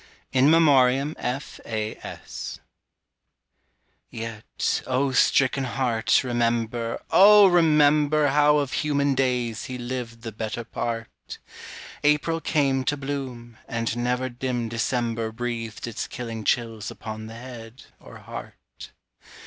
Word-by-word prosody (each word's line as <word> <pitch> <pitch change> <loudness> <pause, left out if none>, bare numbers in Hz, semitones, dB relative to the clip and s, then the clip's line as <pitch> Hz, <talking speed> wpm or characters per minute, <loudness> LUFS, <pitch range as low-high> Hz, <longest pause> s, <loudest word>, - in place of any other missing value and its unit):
IN 135 +2 +4
MEMORIAM 140 -3 +4
F.A.S. 115 -4 -5 1.5
Yet, 115 -1 -3
O 130 +1 +1
stricken 130 +1 +3
heart, 120 -2 +1
remember, 115 -1 -1
O 205 +1 +8
remember 150 -4 +4
How 150 +1 +4
of 140 -2 -1
human 145 -2 +1
days 125 -4 -1
he 130 - -5
lived 120 -2 -6
the 115 - -5
better 110 +2 -4
part. 115 0 -5 0.7
April 150 +3 +2
came 135 -5 +1
to 145 - 0
bloom 130 -4 -6
and 115 -2 -2
never 125 +1 -1
dim 120 -1 -3
December 115 -1 -1
Breathed 115 -1 -4
its 115 -3 -4
killing 115 -3 -6
chills 115 -4 -1
upon 110 0 -7
the 110 - -9
head 120 -1 -10 0.2
or - - -13
heart. - - -11
125 Hz, 110 wpm, -25 LUFS, 115-140 Hz, 1.5 s, O